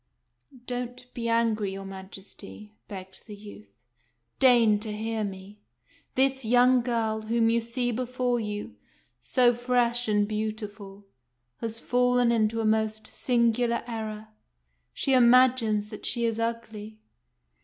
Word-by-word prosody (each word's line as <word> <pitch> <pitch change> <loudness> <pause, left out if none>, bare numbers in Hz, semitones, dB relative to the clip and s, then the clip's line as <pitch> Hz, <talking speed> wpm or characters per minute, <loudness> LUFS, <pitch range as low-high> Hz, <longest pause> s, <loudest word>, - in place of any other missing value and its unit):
" - - -51 0.2
Don't 250 0 -6
be 230 -1 -3
angry, 225 -4 +1
your 195 0 -7
Majesty," 190 - -10
begged 190 +1 -10
the 210 - -8
youth. 200 - -13 0.4
" 120 0 -48
Deign 235 -5 +5
to 215 0 -4
hear 220 +1 -3
me. 195 +1 -8 0.6
This 265 0 +2
young 245 +2 +4
girl, 225 -2 -1
whom 225 +1 +1
you 235 0 +2
see 245 +2 -2
before 250 0 -1
you, 205 - -5 0.4
so 245 - +3
fresh 240 0 0
and 210 -1 +2
beautiful, 210 -2 -5 0.5
has 225 -1 -5
fallen 245 0 +2
into 225 0 +1
a - - -2
most 220 0 0
singular 235 0 0
error. 220 -2 -6 0.6
She 270 - 0
imagines 240 -4 +4
that 215 - -9
she 235 -1 0
is 225 -1 -1
ugly." 225 -2 -4
225 Hz, 135 wpm, -27 LUFS, 210-245 Hz, 0.6 s, Deign